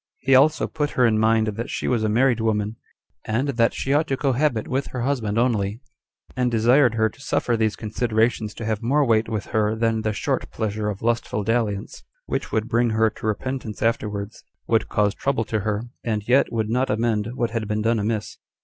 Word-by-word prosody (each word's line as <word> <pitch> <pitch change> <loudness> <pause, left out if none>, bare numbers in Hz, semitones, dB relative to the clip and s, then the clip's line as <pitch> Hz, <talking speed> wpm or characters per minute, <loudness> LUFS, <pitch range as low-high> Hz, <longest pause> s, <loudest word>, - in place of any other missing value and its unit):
He 135 0 +1
also 145 +4 +5
put 150 -2 -2
her 125 - +5
in 110 -2 +3
mind 110 0 +3
that 115 +4 -4
she - - -3
was 120 -3 +1
a 110 - +1
married 120 +2 +3
woman, 110 -1 -1 0.5
and 120 +6 0
that 115 -3 +2
she 135 - -1
ought 155 +2 +2
to 135 - -1
cohabit 135 -3 0
with 135 +2 -1
her 125 -2 -4
husband 120 -6 -1
only; 110 -3 +1 0.6
and 125 0 +1
desired 120 +2 +4
her 110 -1 +3
to 110 - -12
suffer 120 -3 0
these 110 -2 +1
considerations 110 -1 -1
to 115 - -6
have 110 -1 -1
more 140 +5 +2
weight 115 -2 +2
with 110 -3 -3
her 110 0 +2
than 115 0 0
the 110 0 -1
short 100 - -2
pleasure 105 -1 -2
of 100 0 -6
lustful 115 -3 0
dalliance, 110 -2 -2 0.2
which - - -3
would 110 +1 0
bring 120 0 +2
her 110 0 +2
to 110 - -6
repentance 110 -1 -3
afterwards, 105 -2 -2 0.2
would 115 -1 +1
cause 105 -1 +1
trouble 130 -2 -1
to 110 - -1
her, 105 +1 -2 0.2
and 110 -3 -2
yet 130 +3 +3
would 110 -1 -1
not 130 +3 +1
amend 110 +1 0
what 120 -3 -1
had 115 -2 -2
been 105 0 -1
done 115 0 +2
amiss. 110 0 -2
115 Hz, 205 wpm, -23 LUFS, 110-125 Hz, 0.6 s, also